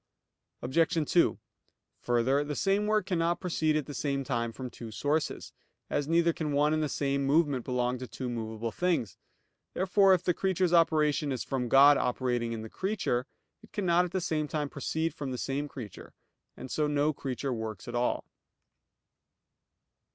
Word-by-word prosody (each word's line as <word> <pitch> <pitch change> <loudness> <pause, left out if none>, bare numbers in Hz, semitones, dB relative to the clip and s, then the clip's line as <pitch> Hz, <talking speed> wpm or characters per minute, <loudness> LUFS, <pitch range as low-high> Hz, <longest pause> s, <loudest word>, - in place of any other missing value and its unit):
Obj. 160 +3 +1
2: 175 - +4 0.6
Further, 120 +4 +1
the 145 0 -4
same 195 - +1
work 215 -2 +2
cannot 170 -2 0
proceed 160 -4 0
at 155 -2 0
the 145 - -7
same 140 0 -1
time 115 -3 -1
from 125 +2 -7
two 115 -1 -9
sources; 145 +8 -2 0.4
as 145 -1 0
neither 170 +1 +3
can 150 -3 -3
one 150 +2 +3
and 155 - +1
the 150 - -1
same 140 0 -1
movement 140 -2 +2
belong 125 0 -1
to 130 - -6
two 130 - -6
movable 115 -1 -4
things. 165 - -1 0.6
Therefore 190 +1 +4
if 180 - -4
the 180 - +2
creature's 185 -1 0
operation 155 -3 +3
is 130 - -2
from 125 -3 -2
God 140 +3 +7
operating 120 -1 -1
in 110 -1 -4
the - - -6
creature, 185 - -2 0.3
it 220 - -18
cannot 180 -3 +2
at 175 - -7
the 185 - -1
same 155 -2 -1
time 150 -1 -2
proceed 160 +4 -2
from 140 -2 -5
the 135 +3 -2
creature; 115 -9 -10 0.4
and 130 - -8
so 150 -1 +1
no 150 +1 +1
creature 135 -1 -3
works 110 -1 -5
at 120 - -6
all. 120 0 0
145 Hz, 170 wpm, -29 LUFS, 125-165 Hz, 0.6 s, God